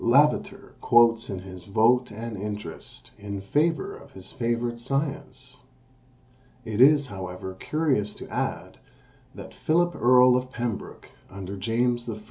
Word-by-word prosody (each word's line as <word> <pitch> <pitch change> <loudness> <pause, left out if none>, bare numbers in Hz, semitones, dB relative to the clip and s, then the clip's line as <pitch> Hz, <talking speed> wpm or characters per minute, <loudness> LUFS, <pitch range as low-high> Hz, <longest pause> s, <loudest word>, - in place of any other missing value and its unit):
Lavater 140 +6 +2
quotes 115 -1 +4
his 95 -3 -8
"Vote 115 +5 +3
and 115 +1 -6
Interest," 105 -4 -7
in 100 -1 -5
favour 150 +10 0
of - - -15
his 95 0 -9
favourite 120 -1 -2
science. 135 -1 -3 1.1
It 110 +1 -1
is, 145 +1 +6
however, 95 -3 -7
curious 125 0 -1
to - - -9
add, - - -4 0.6
that - - -10
Philip 175 +2 +1
Earl 125 +1 +6
of 125 0 -1
Pembroke, 120 -4 -5 0.2
under 95 0 -7
James 120 +4 0
I. 110 - -3
120 Hz, 125 wpm, -26 LUFS, 100-130 Hz, 1.1 s, is